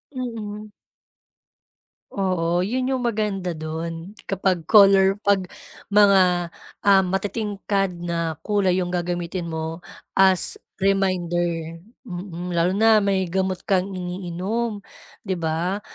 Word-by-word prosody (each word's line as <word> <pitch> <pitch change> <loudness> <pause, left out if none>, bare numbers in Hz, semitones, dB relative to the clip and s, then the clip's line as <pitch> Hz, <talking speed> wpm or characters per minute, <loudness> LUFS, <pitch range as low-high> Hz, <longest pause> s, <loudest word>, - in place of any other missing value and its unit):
Mm. 215 -4 -6 1.4
Oo, 175 -3 0
'yon 255 +8 -1
'yong 260 - 0
maganda 200 -6 -2
do'n 165 +3 -5 0.2
kapag 185 -4 -1
color 195 -2 +6
pag 195 -2 +2 0.4
mga 190 -4 +4 0.3
ah, 200 -1 +6
matitingkad 200 0 -1 0.2
na 170 -2 -2
kulay 200 -4 +1
'yong 180 -1 -1
gagamitin 175 0 -3
mo 160 +1 -4 0.3
as 190 -1 +3 0.2
reminder, 175 -4 0 0.2
mm, 180 -3 -6
lalo 175 +2 +1
na 220 +1 +5
may 195 -2 +1
gamot 190 -1 -1
kang 190 -1 +1
iniinom 185 +5 -3 0.4
'di 190 -3 -3
ba 170 +5 -1
190 Hz, 105 wpm, -23 LUFS, 175-200 Hz, 1.4 s, color